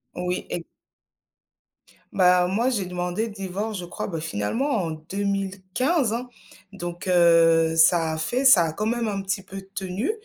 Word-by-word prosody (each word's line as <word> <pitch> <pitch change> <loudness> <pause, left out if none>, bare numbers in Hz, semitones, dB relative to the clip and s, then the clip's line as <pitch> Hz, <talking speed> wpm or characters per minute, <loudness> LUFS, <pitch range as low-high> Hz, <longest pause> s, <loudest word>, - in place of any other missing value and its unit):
Oui 180 0 -3
ex 170 - -4 1.5
Bah, 180 -1 +4
heu, - - -1
moi 230 +6 +1
j'ai 205 -7 -1
demandé 180 +4 -2
le - - -8
divorce, 200 +1 -4
je 175 - -6
crois, 175 - -5
bah 165 -5 -4
finalement 160 - -2
en 165 - -3
2015 195 - -1
hein? 240 +2 -3 0.5
Donc, 175 -1 -6
heu, 165 -2 +5
ça 165 0 +4
a 160 - -3
fait 200 +12 -1
ça 250 -11 +7
a 155 - -3
quand 210 +6 -3
même 235 0 -1
un 200 -2 -2
petit 195 0 -2
peu 195 +1 -8
tenu, 195 - -2
185 Hz, 170 wpm, -24 LUFS, 170-210 Hz, 1.5 s, ça